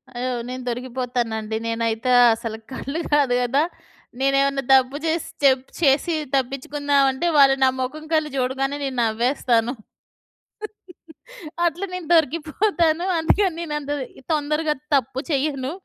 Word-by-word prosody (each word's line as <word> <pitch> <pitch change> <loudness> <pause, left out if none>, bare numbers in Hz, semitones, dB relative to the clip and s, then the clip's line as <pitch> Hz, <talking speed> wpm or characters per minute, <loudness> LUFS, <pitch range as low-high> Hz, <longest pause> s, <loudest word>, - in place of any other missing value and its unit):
అయ్యో! 250 +1 -2 0.2
నేను 255 0 -5
దొరికిపోతానండి. 240 -3 -3
నేనైతే 230 +1 -1 0.2
అసలు 225 -1 -6 0.2
కళ్ళు 280 +5 -4
గాదు 280 -4 +3
గదా! 270 +5 +2 0.6
నేనేవన్నా 275 0 +2
తప్పు 265 +2 +4
జేసి 325 0 -1 0.2
చెప్ 265 -1 +4 0.2
చేసి 295 +3 +3 0.2
తప్పిచ్చుకుందావంటే, 275 +2 0
వాళ్ళు 270 -1 +6
నా 260 - +6
మొఖం 305 +5 -4
కల్లి 310 -1 +2
జూడగానే 270 +2 -1
నేను 265 -2 -3
నవ్వేస్తాను. 235 +1 +1 1.9
అట్ల 345 +3 -1
నేను 365 -3 -6
దొరికిపోతాను. 330 +2 +1
అందుకని 365 +3 +2
నేనంత 295 -3 -4 0.4
తొందరగా 300 +1 0 0.2
తప్పు 265 0 0
చెయ్యను. 275 -1 -1
275 Hz, 110 wpm, -22 LUFS, 255-300 Hz, 1.9 s, వాళ్ళు